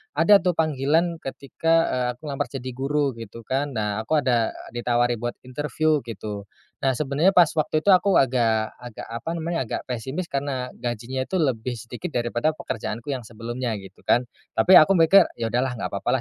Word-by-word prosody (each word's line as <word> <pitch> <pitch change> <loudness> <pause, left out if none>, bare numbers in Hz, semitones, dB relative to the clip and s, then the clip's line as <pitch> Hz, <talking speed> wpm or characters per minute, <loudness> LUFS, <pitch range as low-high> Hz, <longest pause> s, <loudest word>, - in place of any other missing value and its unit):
ada 170 +7 +6
tuh 180 -3 0
panggilan 160 +2 +1
ketika, 140 +4 -2 0.2
eee, 125 -1 0
aku 125 - -34
lamar 135 - -2
jadi 130 -1 -6
guru, 140 +2 0
gitu 115 +1 -9
kan. 135 +3 -2
Nah, 105 -1 -1
aku 145 +6 0
ada 120 -3 +1 0.2
ditawari 120 -1 0
buat 120 +1 -3
interview 150 +3 0
gitu. 105 -2 -6 0.3
Nah, 135 -1 +1
sebenarnya 150 +7 +1
pas 175 -4 +6
waktu 155 0 +1
itu 200 - 0
aku 190 -1 +5
agak 115 -4 +1
agak 120 -3 -9
apa 115 +7 -5
namanya, 165 -2 -2
agak - - -4
pesimis 130 +9 -4
karena, 135 -2 -2
gajinya 120 +2 -3
tuh 185 +3 -1
lebih 125 -4 -1
sedikit 120 - -7
daripada 120 +5 0
pekerjaanku 115 -2 -5
yang 130 -4 -3
sebelumnya 120 +2 -4
gitu 95 - -15
kan. 120 +1 +2 0.2
Tapi 180 +12 +7
aku 175 +5 +7
mikir, 175 +2 +6
"Ya, 115 -1 -3
udahlah 125 +2 0
nggak 120 - -4
papa - - -3
130 Hz, 180 wpm, -24 LUFS, 120-155 Hz, 0.3 s, Tapi